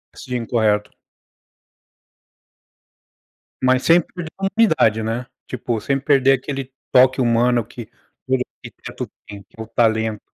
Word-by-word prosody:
Sim, 125 -2 -5
correto. 105 -3 +1 2.7
Mas 130 0 +3
sem 170 +1 +5
perder 170 0 -9
a 195 - -1
humanidade, 160 - +2
né? 115 +3 -3 0.2
Tipo 120 -2 -3
sem 135 +5 -1
perder 135 -1 +4
aquele 135 0 -4 0.2
toque 130 +1 +5
humano 120 0 +2
que 120 0 -9 0.4
todo 130 -1 +1 0.2
arquiteto - - -8 0.2
tem, 100 -1 -10
que 95 - -24
é - - -4
o - - -13
talento. 110 -1 +1
125 Hz, 130 wpm, -20 LUFS, 110-135 Hz, 2.7 s, sem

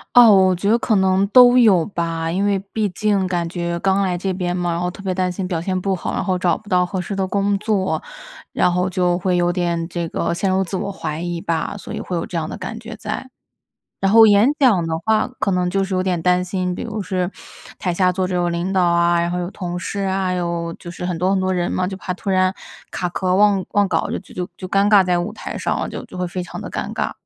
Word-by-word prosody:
啊， 240 -2 +9
我 190 -2 +5
觉 200 +4 0
得 230 - +4
可 235 -4 +1
能 190 +1 +3
都 245 +2 +7
有 195 -9 +5
吧。 165 -3 -3
因 195 +3 0
为 200 -1 +2
毕 215 -2 0
竟 200 0 0
感 175 -2 -1
觉 170 -1 -3
刚 195 +1 +2
来 185 -2 0
这 190 +1 -2
边 180 -1 -2
嘛， 175 -1 -1
然 170 - -2
后 180 0 -1
特 195 - -11
别 190 -2 -2
担 185 -1 0
心 180 +1 -4
表 175 -3 -2
现 185 +1 -1
不 190 +1 -1
好， 180 - -4
然 - - -1
后 185 -2 0
找 180 -2 +1
不 215 - -15
到 180 -2 +3
合 185 +1 -3
适 190 +3 -4
的 195 -1 -1
工 200 +1 0
作， 205 -2 -1 0.5
然 180 - +2
后 180 +1 +1
就 180 -1 +1
会 180 0 0
有 175 0 +2
点 170 -2 -1
这 170 -1 -4
个 - - -2
陷 190 +2 0
入 190 +1 +2
自 190 +1 -4
我 200 +1 -3
怀 160 -5 -5
疑 175 -1 -3
吧， 165 +4 -2
所 - - -8
以 - - -4
会 180 - -4
有 165 - -2
这 175 - -6
样 155 - -3
的 - - -6
感 210 +4 -6
觉 225 0 -9
在。 220 +4 -5 0.7
然 195 - +2
后 225 +2 +8
演 205 +3 +5
讲 215 - +3
的 160 0 -1
话 220 -1 +2
可 195 - +1
能 180 -1 +1
就 195 +1 0
是 190 0 -4
有 185 - +1
点 180 -3 -1
担 180 +1 +2
心， 185 0 -2
比 - - -5
如 220 -2 -4
是 185 -1 -1 0.5
台 180 - -2
下 185 +1 +3
坐 185 0 0
着 185 - -3
有 175 0 +1
领 170 +2 -2
导 190 -1 +2
啊， 170 0 +3
然 170 0 0
后 180 - -2
有 180 +2 -4
同 175 -2 -5
事 200 +3 -4
啊， 190 -1 0
有 170 -1 -2
就 175 - -9
是 175 +1 -6
很 180 -2 -2
多 180 +3 +1
很 195 - +2
多 185 0 0
人 175 -1 -1
嘛， 185 - 0
就 190 0 -5
怕 185 -1 -4
突 195 - -6
然 185 0 +2 0.4
卡 180 - -2
壳 185 +1 0
忘 200 -2 +4
忘 205 -1 +3
稿 - - 0
就 - - -2
就 - - -17
就 180 0 -4
就 185 - -7
尴 200 +1 +3
尬 205 -3 +6
在 180 -1 +1
舞 175 - -4
台 - - -6
上 - - -1
了， - - -3
就 - - -6
就 - - -11
会 180 - -1
非 180 +1 -4
常 180 - -7
地 - - -7
尴 - - -4
尬。 - - -2
185 Hz, 295 characters per minute, -20 LUFS, 175-195 Hz, 0.7 s, 啊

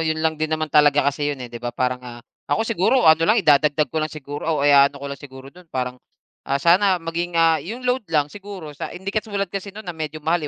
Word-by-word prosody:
yun 160 -1 0
lang 160 -1 0
din 155 - 0
naman 155 -1 -2
talaga 145 -1 +5
kasi 145 +1 -2
yun 145 - -2
eh, 120 - -11
di 120 - -7
ba, 120 - -3
parang, 125 +1 -2
ah, 120 -1 -11 0.2
ako 225 - +1
siguro 230 +3 +2
ano 160 0 +6
lang, 215 - +5
idadagdag 150 -1 +3
ko 160 - 0
lang 155 - -1
siguro 145 +1 -7
o 140 - 0
kaya 140 -1 +6
i-aano 140 - -15
ko 140 - -9
lang 140 -2 -6
siguro 135 0 -12
dun 180 -1 -17
parang, 125 -2 -4 0.5
ah, 140 - +2
sana 185 +5 +4
maging, 170 +1 -4
ah, 165 -1 +4
yung 235 +8 -7
load 250 -6 -1
lang 150 -2 0
siguro 195 -7 -9
sa - - -6
hindi 195 +2 -6
katulad 205 -4 -2
kasi 195 0 -4
noon 210 +2 -10
na 175 - -5
medyo 155 -1 -5
mahal 170 +2 +2
155 Hz, 250 wpm, -22 LUFS, 140-180 Hz, 0.5 s, ano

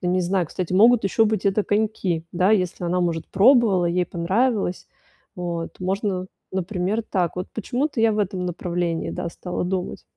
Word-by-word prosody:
ну, 180 - -1
не 185 0 +2
знаю, 180 -1 0
кстати, 180 +2 -4
могут 230 +5 +6
ещё 220 +3 +3
быть 215 -2 -1
это 200 +1 +2
коньки, 205 -6 0
да? 180 +3 +2
Если 180 -3 0
она, 180 +1 0
может, 170 -2 -1
пробовала, 205 -4 +4
ей 180 +1 +1
понравилось. 195 +3 0 0.5
Вот. 175 -1 -5
Можно, 190 0 -1 0.3
например, 190 +3 -1
так, 180 -6 -1
вот 180 - -4
почему-то 250 +4 -2
я 225 -1 +4
в 210 - -2
этом 185 -3 -1
направлении, 175 -1 -2
да, 170 - -4
стала 180 +1 -4
думать. 185 0 -3
185 Hz, 170 wpm, -23 LUFS, 175-210 Hz, 0.5 s, могут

